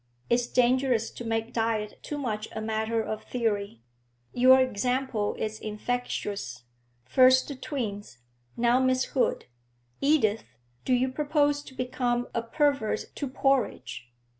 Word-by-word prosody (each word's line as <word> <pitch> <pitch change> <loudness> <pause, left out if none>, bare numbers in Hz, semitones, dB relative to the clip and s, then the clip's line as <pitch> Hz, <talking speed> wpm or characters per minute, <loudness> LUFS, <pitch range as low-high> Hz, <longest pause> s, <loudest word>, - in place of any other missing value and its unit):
It's 240 0 +3
dangerous 250 -2 +2
to - - -8
make 225 0 -2
diet 225 -2 -1
too 295 - -5
much 220 -6 -3
a - - -4
matter 220 +1 -1
of 215 0 -5
theory. 205 - -2 0.5
Your 260 +1 +7
example 250 -2 0
is 215 0 -4
infectious; 210 - -3 0.4
first 255 - +5
the 285 - -5
twins; 210 - -5 0.4
now 240 +1 +3
Miss 260 0 +2
Hood. 265 - +1 0.6
Edith, 220 - +1 0.3
do 255 - +2
you 255 +1 +1
propose 290 +1 +1
to 265 - -13
become 245 -1 -1
a 230 - 0
pervert 275 0 0
to 285 - -4
porridge?' 235 - -1
240 Hz, 130 wpm, -27 LUFS, 215-260 Hz, 0.6 s, Your